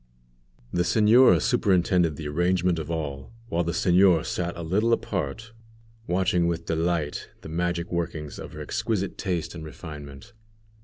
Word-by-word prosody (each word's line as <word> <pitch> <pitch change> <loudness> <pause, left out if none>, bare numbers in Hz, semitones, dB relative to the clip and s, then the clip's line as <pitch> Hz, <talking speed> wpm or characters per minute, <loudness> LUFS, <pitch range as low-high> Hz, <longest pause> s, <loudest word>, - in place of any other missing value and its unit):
The 90 - +2
señora 110 +8 +5
superintended 90 - +2
the 75 0 -6
arrangement 85 +2 +1
of 80 0 -6
all, 75 - -4 0.2
while 85 +1 0
the 85 - -1
señor 90 0 +4
sat 85 -1 -3
a 85 - -5
little 105 +8 +2
apart, 100 +2 -3 0.6
watching 90 -1 +2
with 85 -1 -2
delight 80 -2 -1
the - - -9
magic 85 +1 -2
workings 80 -4 -3
of - - -8
her - - -7
exquisite 100 -4 -2
taste 90 -5 -2
and 85 -2 -8
refinement. 75 - -10
85 Hz, 145 wpm, -26 LUFS, 80-95 Hz, 0.6 s, señora